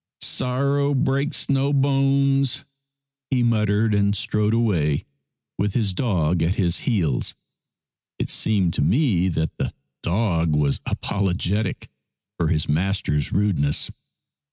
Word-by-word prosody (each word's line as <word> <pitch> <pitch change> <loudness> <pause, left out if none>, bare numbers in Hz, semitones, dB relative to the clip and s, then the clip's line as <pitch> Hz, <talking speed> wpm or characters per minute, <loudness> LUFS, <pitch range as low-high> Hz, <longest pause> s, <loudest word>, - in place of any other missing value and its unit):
"Sorrow 140 +3 0
breaks 140 +2 0
no 140 0 +1
bones," 135 -1 +2 0.6
he 125 -3 +1
muttered, 110 -1 +2
and 100 0 +2
strode 105 +2 0
away 85 -11 +1 0.5
with 100 -1 -1
his 105 -6 +1
dog 90 - 0
at 85 +4 +1
his 85 -4 +1
heels. 85 - 0 0.8
It - - -1
seemed 95 -6 +2
to - - -1
me 95 - +2
that 80 -2 -2
the - - -3 0.3
dog 85 -5 0
was 75 -2 +1
apologetic 95 +1 -1 0.5
for 85 - +1
his 75 -1 +1
master's 80 -2 0
rudeness. 80 -9 0
100 Hz, 115 wpm, -22 LUFS, 85-130 Hz, 0.8 s, bones